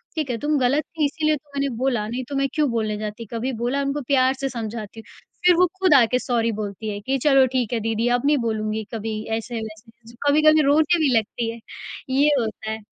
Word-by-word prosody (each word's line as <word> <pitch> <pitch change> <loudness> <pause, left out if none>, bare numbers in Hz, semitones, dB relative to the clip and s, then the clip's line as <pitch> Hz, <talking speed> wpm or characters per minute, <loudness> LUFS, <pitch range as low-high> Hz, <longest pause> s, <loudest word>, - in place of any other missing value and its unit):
ठीक 305 -4 -2
है? 235 - -1
तुम 295 +4 0
गलत 270 +5 +2
थीं 315 -3 -2
इसीलिए 310 +1 +1
तो 295 +1 -13
मैंने 280 0 0
बोला, 240 -5 0
नहीं 250 +3 -4
तो 280 - -4
मैं 275 0 +1
क्यों 300 -3 +1
बोलने 215 -2 -1
जाती, 215 +2 -6
कभी 245 +4 -2
बोला?" 275 +4 0
उनको 280 +1 -2
प्यार 260 -1 +3
से 270 -1 -1
समझाती 225 -2 -6
हूँ। - - -15 0.3
फिर 355 -1 +7
वो 365 +1 +5
खुद 370 -5 +4
आके 250 0 +4
सॉरी 230 -3 0
बोलती 210 0 -5
है 205 - -5
कि, 270 +5 -1
"चलो 270 -1 +4
ठीक 245 -2 0
है, 230 - +1
दीदी 225 +2 -1
अब 260 - -6
नहीं 295 0 +4
बोलूँगी 215 0 -2
कभी।" 220 0 -3 0.2
ऐसे-वैसे 225 -1 -7 0.2
ज - - -18
कभी-कभी 310 +1 +5
रोने 310 +4 +4
भी 280 -5 +2
लगती 225 +1 -2
है, 230 - -10 0.5
ये 280 +3 +3
होता 220 -1 -4
है। 220 - -4
250 Hz, 225 wpm, -22 LUFS, 225-285 Hz, 0.5 s, फिर